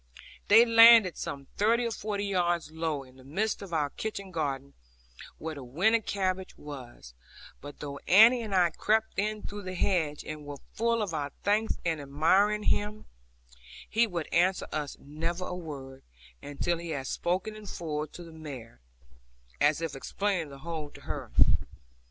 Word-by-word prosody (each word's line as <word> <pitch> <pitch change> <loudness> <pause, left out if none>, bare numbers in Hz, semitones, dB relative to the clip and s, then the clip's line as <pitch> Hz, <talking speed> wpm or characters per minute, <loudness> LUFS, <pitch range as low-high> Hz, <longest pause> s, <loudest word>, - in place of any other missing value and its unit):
They 225 +3 +8
landed 230 -4 +8
some 140 -1 -5
thirty 230 +4 +3
or 230 - -1
forty 205 -2 -3
yards 175 -4 0
lower, 160 -4 -2
in 130 0 -19
the 130 - -15
midst 195 +11 -2
of 195 -3 -8
our 150 -3 0
kitchen 200 -3 -5
garden, 140 -4 -3 0.6
where 160 0 -5
the 140 -3 -8
winter 185 - +2
cabbage 190 -3 -2
was; 125 - -10 0.5
but 145 +1 -10
though 140 -1 -6
Annie 225 +6 +7
and 210 -4 -3
I 175 -2 +4
crept 220 +5 +1
in 215 +1 -1
through 205 0 -6
the 185 -1 -6
hedge, 160 -6 0
and 155 -1 -6
were 145 -1 -7 0.2
full 230 0 +1
of 190 -5 -4
our 145 -2 -2
thanks 215 +2 +1
and 160 -3 0
admiring 185 +9 +2
him, 210 +1 0 0.8
he 230 +1 +2
would 170 -6 -3
answer 185 +3 +3
us 150 -2 -3
never 165 +5 -4
a 180 - -4
word, 135 -6 -8 0.4
until 165 +4 -2
he 170 0 -7
had 140 -4 -3
spoken 185 +9 -2
in 215 -1 -11
full 155 -4 -3
to 175 - -11
the 165 - -12
mare, 135 - -9 0.8
as 145 +2 +3
if 165 -4 -3
explaining 180 +3 -2
the 140 - -10
whole 160 -3 -4
to - - -15
her. - - -6
170 Hz, 170 wpm, -29 LUFS, 145-205 Hz, 0.8 s, They